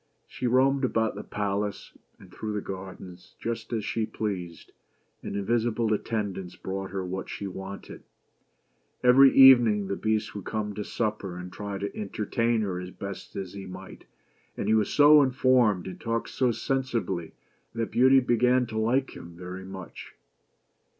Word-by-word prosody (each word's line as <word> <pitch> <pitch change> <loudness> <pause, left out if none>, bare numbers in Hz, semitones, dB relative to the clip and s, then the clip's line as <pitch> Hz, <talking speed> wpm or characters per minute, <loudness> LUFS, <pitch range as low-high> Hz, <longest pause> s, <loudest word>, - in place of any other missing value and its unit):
She 125 - -4
roamed 135 +3 +3
about 110 -3 +1
the - - -6
palace, 100 0 -3 0.2
and - - -17
through 110 -1 -4
the 105 - -1
gardens, 95 -2 -9
just 115 -1 -4
as 110 -3 -2
she 110 -1 -1
pleased, 90 -6 -5 0.5
and - - -6
invisible 115 +2 0
attendants 100 -4 -3
brought 95 0 -5
her 95 -1 -4
what 95 +1 -5
she 100 - -5
wanted. 95 +1 -8 1.0
Every 130 +2 +7
evening 120 -7 +7
the 100 - -1
Beast 110 0 -1
would 100 - -6
come 105 -1 -3
to 105 +1 -4
supper, 105 -5 -3
and 90 0 -8
try 100 +1 -5
to 100 +1 -5
entertain 110 +3 -1
her 95 -4 -2
as 90 0 -7
best 100 0 -8
he 95 0 -6
might; 90 - -10 0.5
and - - -3
he - - +3
was 110 -2 +2
so 150 +1 +7
well 145 - +7
informed, 125 -7 +3
and 95 - -8
talked 115 0 -2
so 125 -2 +1
sensibly, 115 -10 -2 0.4
that 115 -1 -2
Beauty 130 +2 +5
began 125 +1 +3
to 110 -1 -4
like 130 +5 0
him 85 0 -11
very 90 +1 -7
much. 95 -2 -10
105 Hz, 160 wpm, -27 LUFS, 95-120 Hz, 1.0 s, Every